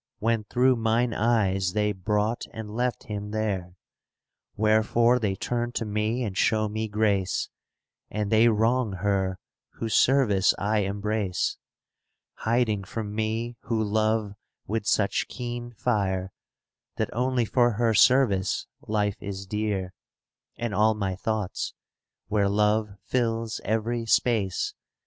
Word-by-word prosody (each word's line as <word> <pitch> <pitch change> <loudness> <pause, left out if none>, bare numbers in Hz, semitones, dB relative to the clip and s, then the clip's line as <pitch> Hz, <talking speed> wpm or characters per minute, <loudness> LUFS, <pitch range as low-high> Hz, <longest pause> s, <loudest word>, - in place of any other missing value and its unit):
When 115 -1 0
through 125 +3 +3
mine 115 +1 +1
eyes 100 -5 +1
they 105 0 +1
brought 105 +4 -1
and 110 -1 -7
left 125 +1 -1
him 105 -1 -5
there. 100 -5 -2 0.8
Wherefore 110 +3 +3
they 100 -4 0
turn 120 +4 -2
to 115 - -2
me 105 +4 -1
and 100 -5 -3
show 110 +2 +2
me 110 +1 -3
grace: 105 -4 0 0.6
And 105 0 -2
they 110 +1 +6
wrong 115 0 +2
her, 95 -1 0 0.4
whose 115 -1 -4
service 115 -8 +4
I 105 +2 +1
embrace, 100 -1 -1 0.8
^ - - -12
Hiding 110 -3 +1
from 105 +1 -5
me 110 +2 -2
who 115 -1 0
love 110 0 0 0.3
with 110 0 -2
such 100 -2 +1
keen 120 -1 -5
fire, 95 -4 -1 0.6
That - - -2
only 125 0 +1
for 120 +1 +3
her 115 +1 +2
service 105 -4 +3 0.2
life 105 -2 -1
is 100 -1 -5
dear; 100 -2 -2 0.6
And 115 -2 -3
all 110 +2 +3
my 95 -3 -2
thoughts, 105 0 -3 0.5
where 100 -2 +1
Love 105 +1 +2
fills 115 -1 -1
every 115 +2 -1
space. 110 -5 +1
110 Hz, 130 wpm, -26 LUFS, 100-115 Hz, 0.8 s, they